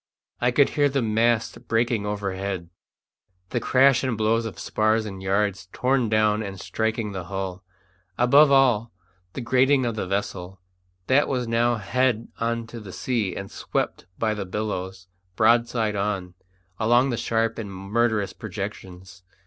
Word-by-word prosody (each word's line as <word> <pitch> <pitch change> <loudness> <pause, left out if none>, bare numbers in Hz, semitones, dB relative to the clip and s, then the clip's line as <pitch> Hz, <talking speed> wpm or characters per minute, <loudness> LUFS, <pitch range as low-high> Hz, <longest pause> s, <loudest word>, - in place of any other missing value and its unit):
I 120 - +2
could 135 +3 +4
hear 145 -2 +2
the 135 -2 0
masts 115 +1 +1
breaking 115 -2 0
overhead 95 -3 -3 0.8
the 120 - 0
crash 130 +2 +4
and 130 -4 -1
blows 110 +1 +1
of - - -9
spars 110 +1 +1
and 95 -2 -7
yards 95 -1 0
torn 125 -2 +1
down 110 0 +2
and 100 -2 -6
striking 110 +1 -2
the 95 -3 -5
hull; 95 0 -5 0.5
above 140 +5 +6
all 125 -5 +4 0.4
the - - -5
grating 130 +2 +3
of 120 - -1
the 105 -4 -4
vessel, 95 -1 -3 0.5
that 135 +3 +3
was 125 -3 -1
now 120 +1 +2
head 115 +2 0
on 115 0 -1
to 115 +1 -9
the 105 -3 -10
sea 110 -4 -2
and 100 0 -6
swept - - -3
by 110 -1 0
the 105 -2 -4
billows, 95 -2 -4 0.3
broadside 115 -1 +2
on, 100 -3 -2 0.5
along 120 +4 +3
the - - 0
sharp 115 0 0
and 105 -3 -5
murderous 105 +2 0
projections. 95 -2 -7
110 Hz, 150 wpm, -24 LUFS, 100-120 Hz, 0.8 s, above